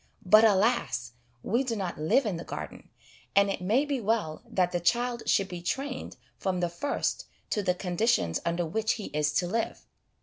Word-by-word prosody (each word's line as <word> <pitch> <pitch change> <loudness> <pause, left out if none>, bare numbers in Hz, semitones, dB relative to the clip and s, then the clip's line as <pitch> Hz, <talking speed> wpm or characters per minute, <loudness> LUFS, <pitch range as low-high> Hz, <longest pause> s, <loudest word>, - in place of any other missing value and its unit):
But 215 +4 +7
alas! 190 - +2 0.3
we 235 +5 +1
do 240 -3 -2
not 185 -7 -4
live 235 - +3
in 200 -6 -1
the 170 - -6
Garden, - - -7 0.5
and 200 0 +5
it 190 - -4
may 225 +10 +2
be 280 -4 -2
well 205 -8 -1
that 180 -2 +1
the 175 - 0
child 240 +6 +1
should 195 - +3
be 180 -2 -7
trained 265 +9 -4 0.2
from 185 -2 -1
the 175 -1 0
first 175 +12 -2 0.2
to 210 - +1
the 180 -2 +1
con 180 -1 -4
ditions 90 - +2
under 170 +1 0
which 220 +6 0
he 215 - -6
is 150 -1 +1
to 180 - +2
live. 225 +6 -2
195 Hz, 195 wpm, -28 LUFS, 175-230 Hz, 0.5 s, But